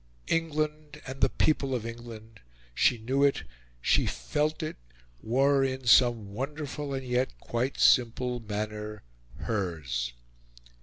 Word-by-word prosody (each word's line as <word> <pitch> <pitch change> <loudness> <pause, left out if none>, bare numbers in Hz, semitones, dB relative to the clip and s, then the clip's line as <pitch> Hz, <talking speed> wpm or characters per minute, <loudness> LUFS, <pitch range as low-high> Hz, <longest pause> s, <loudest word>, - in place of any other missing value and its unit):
England 155 -2 -1
and 135 0 -7
the 135 - +5
people 135 -3 +1
of 115 -3 -3
England, 115 -1 -9 0.3
she 120 - +3
knew 130 +5 0
it, 140 - +3 0.4
she - - +3
felt 155 +2 -1
it, 155 - -4 0.4
were, 135 +4 +3
in 130 -1 -2
some 115 -4 +5
wonderful 145 +3 -4
and 135 -1 -3
yet 125 +1 -1
quite 125 +3 -2
simple 125 0 +3
manner, 105 -1 -5 0.4
hers. 75 - -2
125 Hz, 120 wpm, -29 LUFS, 110-140 Hz, 0.4 s, the